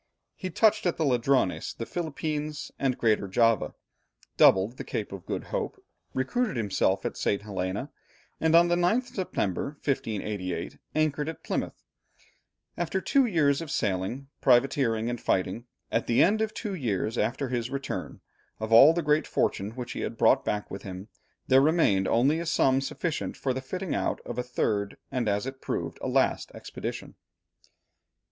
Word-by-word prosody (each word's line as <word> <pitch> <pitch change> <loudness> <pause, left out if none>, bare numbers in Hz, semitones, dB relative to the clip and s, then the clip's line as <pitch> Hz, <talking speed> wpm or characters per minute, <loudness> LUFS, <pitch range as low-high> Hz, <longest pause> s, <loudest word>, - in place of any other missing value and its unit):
He 185 - -5
touched 215 -2 +3
at 175 - 0
the 160 - +1
Ladrones, 125 - +1
the 115 - -5
Philippines, 155 -2 -4
and 135 -2 +1
Greater 110 -4 +2
Java, 115 +3 +2 0.6
doubled 100 +6 +5
the - - -5
Cape 105 - -4
of 95 -3 -9
Good - - -3
Hope, - - -2 0.4
recruited 215 - 0
himself 100 -3 +1
at - - -2
St. 100 0 0
Helena, 100 +6 -3 0.5
and 160 0 +3
on 170 +1 +7
the 175 - +2
9th 215 +9 +1
September, 140 - -2
1588, 105 - -2 0.2
anchored 155 -1 +1
at 160 - -8
Plymouth, - - -3 0.9
after 175 +2 -1
two 270 +6 +3
years 150 -7 +2
of 165 - -6
sailing, 105 +5 -1
privateering, 120 -3 +3
and 120 -1 -3
fighting. 95 +5 0 0.3
At 115 +1 0
the 115 - +5
end 215 +4 +3
of 220 -1 -1
two 210 -4 -4
years 115 - -1
after 130 +3 -1
his 120 -1 -2
return, 140 0 -5 0.4
of 110 +1 -2
all 135 +8 +9
the 170 0 -1
great 150 +1 +2
fortune 100 - 0
which 125 -2 -5
he - - -5
had - - -4
brought - - +4
back 105 0 -2
with 95 - -6
him, 95 +2 -8 0.4
there 130 0 +6
remained 135 - +3
only 135 +7 +3
a 170 - -4
sum 135 -5 +3
sufficient 160 +4 -3
for 130 - -1
the 130 - -4
fitting 180 +6 -4
out - - -1
of 120 0 -5
a - - +2
third, 105 -5 -1
and 125 -5 0
as 100 +3 0
it 135 0 -7
proved, - - -3
a - - -2
last - - +1
expedition. - - -6
130 Hz, 165 wpm, -27 LUFS, 110-155 Hz, 0.9 s, all